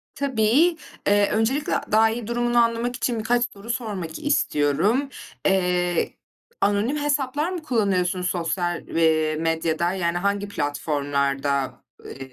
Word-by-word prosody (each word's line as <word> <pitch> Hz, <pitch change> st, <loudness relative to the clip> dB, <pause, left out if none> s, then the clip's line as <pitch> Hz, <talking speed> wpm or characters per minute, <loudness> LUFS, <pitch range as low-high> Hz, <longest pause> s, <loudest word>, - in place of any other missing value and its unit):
Tabii. 280 Hz, +6 st, +2 dB, 0.3 s
Iıı, 205 Hz, 0 st, +4 dB
öncelikle 240 Hz, +7 st, 0 dB, 0.2 s
daha 220 Hz, +1 st, +5 dB
iyi 225 Hz, -1 st, -4 dB
durumunu 240 Hz, 0 st, 0 dB
anlamak 235 Hz, +1 st, +2 dB
için 235 Hz, -1 st, -1 dB
birkaç 240 Hz, +2 st, +1 dB
soru 200 Hz, +3 st, -12 dB
sormak 205 Hz, -9 st, -4 dB
istiyorum. 215 Hz, -, +1 dB, 0.4 s
Eee, 180 Hz, -2 st, +1 dB, 0.5 s
anonim 205 Hz, +8 st, +1 dB
hesaplar 290 Hz, +1 st, 0 dB
mı 360 Hz, -3 st, -4 dB
kullanıyorsun 190 Hz, -8 st, 0 dB
sosyal, 175 Hz, 0 st, -2 dB
eee, 155 Hz, -1 st, +2 dB
medyada, 165 Hz, +1 st, 0 dB
yani 175 Hz, -2 st, -1 dB
hangi 200 Hz, +2 st, -1 dB
platformlarda, 140 Hz, -4 st, -1 dB, 0.3 s
ııı, -, -, -9 dB
205 Hz, 115 wpm, -23 LUFS, 165-240 Hz, 0.5 s, daha